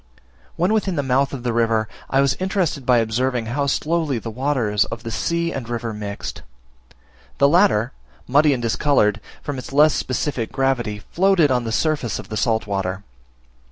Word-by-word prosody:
When 180 +5 +1
within 205 -4 0
the 145 - 0
mouth 135 +1 +1
of 130 -4 -6
the 120 -2 -1
river, 115 -2 +1 0.2
I 135 - +3
was 140 -1 +3
interested 185 -8 -1
by 125 -1 +5
observing 120 +2 0
how 140 +5 -1
slowly 155 -1 0
the 115 0 -5
waters 120 -5 +1
of 115 0 -7
the 115 - -5
sea 170 +6 -1
and 125 -4 -5
river 115 -1 -3
mixed. 105 -1 -6 1.0
The 140 - +5
latter, 145 - +3 0.4
muddy 145 +4 +4
and 125 -3 -1
discoloured, 110 -1 +2 0.2
from 145 -3 -4
its 130 - -9
less 150 +2 +5
specific 130 -3 -2
gravity, 120 -6 -1
floated 180 -5 +3
on 125 -2 +1
the 115 - -3
surface 145 -2 0
of - - -9
the 110 - -4
salt 110 0 +1
water. 95 -1 -3
130 Hz, 175 wpm, -21 LUFS, 115-145 Hz, 1.0 s, by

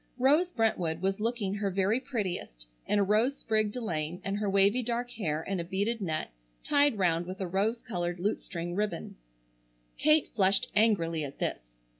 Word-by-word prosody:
Rose 295 +8 +4
Brentwood 180 - 0
was 195 +1 0
looking 220 -3 -1
her 200 -1 -1
very 195 +5 +1
prettiest 185 - -4 0.2
in 210 - +2
a 205 - +4
rose 220 +8 +2
sprigged 215 -2 0
delaine 175 -8 -3
and 195 +1 -2
her 210 -1 0
wavy 200 +5 +4
dark 245 +1 -2
hair 160 -9 -2
in 195 -2 -2
a - - -1
beaded 200 +6 -1
net 160 - -2 0.3
tied 285 -5 +3
round 175 -2 +1
with 185 +1 -6
a 190 - -1
rose 205 +6 0
colored 175 -5 -3
lute 205 +5 -1
string 175 -2 -5
ribbon. 205 -3 -2 0.8
Kate 305 0 +4
flushed 195 -2 +2
angrily 170 -8 +2
at 140 -1 -7
this. - - -2
200 Hz, 175 wpm, -30 LUFS, 175-230 Hz, 0.8 s, Rose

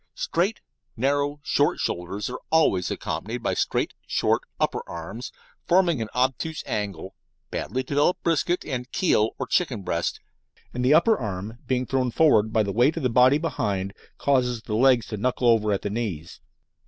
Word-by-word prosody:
Straight, 225 - -1 0.4
narrow, 145 +3 0
short 145 +1 +2
shoulders 95 +4 -3
are 125 +1 -5
always 125 - +3
accompanied 115 +3 -4
by - - 0
straight, - - 0
short, - - +1 0.2
upper - - 0
arms, 85 +8 -7 0.4
forming 175 -7 +3
an 110 - -4
obtuse 135 +5 -1
angle, 100 -3 -4 0.4
badly 130 +1 -2
developed 145 +6 +1
brisket 170 +2 +1
and 125 -2 -4
"keel" 110 - +2
or 130 - -3
chicken 125 - 0
breast, 85 -1 -2 0.5
and 125 - -2
the 135 +4 +5
upper 210 +7 +4
arm 105 +2 -5
being 130 -1 0
thrown 130 0 0
forward 115 -6 +3
by 110 -1 +3
the 100 -1 -3
weight 125 - +3
of 165 - -3
the 125 - +2
body 125 +4 +5
behind 100 - -2 0.2
causes 125 -4 +1
the 110 - -5
legs 125 0 +4
to 105 - -5
knuckle 125 +3 0
over 110 -2 +4
at 100 - -1
the 100 - -1
"knees." 95 -8 -4
125 Hz, 165 wpm, -25 LUFS, 105-145 Hz, 0.5 s, the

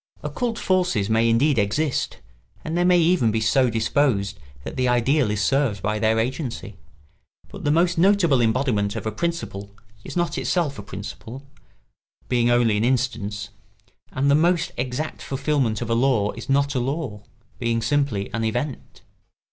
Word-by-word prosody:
Occult 240 -3 -2
forces 180 - +1
may 115 +1 +3
indeed 125 +3 +3
exist, 125 +9 -1 0.5
and 160 - -3
they 175 - +2
may 180 0 +5
even 170 -8 +3
be 110 +1 0
so 125 +4 +3
disposed 110 -3 0 0.2
that - - -7
the 130 -1 +1
ideal 125 +2 +2
is 105 0 -1
served 135 -8 +1
by 105 +1 -1
their 110 +1 +2
agency; 120 - -3 0.7
but - - -9
the - - +2
most 170 +2 +2
notable 175 -8 +4
embodiment 110 -4 +1
of - - -5
a 110 - -1
principle 110 -8 -4 0.3
is - - -6
not 175 -1 0
itself 155 - -1
a - - -4
principle, 110 +6 -8 0.8
being 120 -1 +2
only 120 -3 +3
an 105 - 0
instance, 115 -5 -1 0.6
and 140 +2 +1
the - - +5
most 165 +2 +2
exact 130 +5 -4
fulfilment 135 -5 -1
of 115 - -7
a - - +4
law 115 -4 +2
is - - -10
not 140 +1 +2
a 130 - 0
law, 130 -4 -3 0.4
being 115 -1 0
simply 115 -4 0
an 115 - -1
event. 125 +5 -4
125 Hz, 165 wpm, -23 LUFS, 110-150 Hz, 0.8 s, may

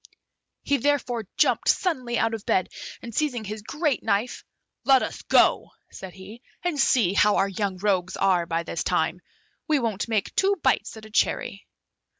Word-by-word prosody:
He 285 - +1
therefore 245 -5 -1
jumped 255 -6 +2
suddenly 255 -10 0
out 225 0 +1
of 220 -2 -5
bed, 185 - +1 0.3
and 235 - -8
seizing 250 -4 -1
his 215 +1 -6
great 295 +4 -1
knife, 220 +3 -1 0.4
"Let 265 -2 +5
us - - -5
go," - - +3 0.2
said 190 -1 -10
he, 200 +5 -12 0.2
"and 350 -5 -1
see 220 -9 +3
how 210 +1 +4
our 195 - +2
young 195 -1 -3
rogues 185 -2 0
are 180 -3 +2
by 165 0 -1
this 170 - -4
time; 175 0 0 0.5
we 310 -2 +3
won't 225 -6 -2
make 215 -3 -1
two 395 +1 +2
bites 260 -3 +1
at 220 - -11
a 215 - -14
cherry." - - -1
220 Hz, 170 wpm, -25 LUFS, 195-260 Hz, 0.5 s, Let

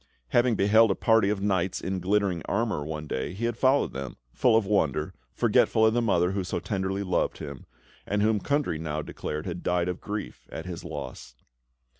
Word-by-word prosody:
Having 120 -1 +3
beheld 110 +3 +5
a 95 - +2
party 110 -3 +3
of 105 -2 -1
knights 95 -2 0
in 95 0 -3
glittering 95 -2 +1
armour 105 -7 -1
one 75 0 -5
day, 70 +3 -3
he 110 +5 -3
had 120 -1 -1
followed 130 +3 +2
them, 70 -1 -6 0.2
full 120 -3 +4
of 115 - +1
wonder, 95 -9 0 0.2
forgetful 110 - +3
of 110 - +4
the 120 - +2
mother 90 -5 +2
who 95 -1 -1
so 90 - -2
tenderly 95 0 -2
loved 90 -2 0
him, 70 -3 -8 0.4
and 105 0 +1
whom 110 -1 +3
Kundry 140 - 0
now 75 -1 -3
declared 75 +1 -5
had 90 -2 -4
died 90 -1 0
of 90 0 -3
grief 105 0 -6
at 80 - -6
his 90 -2 -6
loss. 60 -1 -7
95 Hz, 195 wpm, -27 LUFS, 85-110 Hz, 0.4 s, beheld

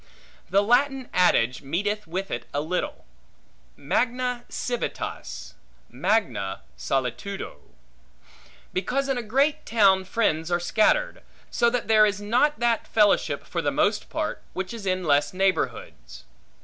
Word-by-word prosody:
The 195 +3 +3
Latin 260 +3 +2
adage 130 -9 +3
meeteth 205 +9 -2
with 190 +4 -4
it - - -4
a 145 - +1
little: 170 +4 -3 0.7
Magna 245 - -1
civitas, 245 -1 -4 0.4
magna 170 - 0
solitudo; 125 - -3 1.2
because 270 +9 -1
in 270 -2 0
a - - -2
great 270 +7 +1
town 195 -4 +4
friends 165 -6 0
are 175 0 +1
scattered; 230 - +1 0.3
so 235 - +3
that 245 0 -2
there 215 -1 +6
is 205 -1 -2
not 245 +9 +1
that 235 -1 +1
fellowship, 210 -2 +2
for - - -3
the - - +1
most - - 0
part, - - -3
which 190 +3 -4
is 215 -4 -7
in 185 0 0
less 145 +2 +2
neighborhoods. 60 - -2
205 Hz, 130 wpm, -25 LUFS, 175-240 Hz, 1.2 s, there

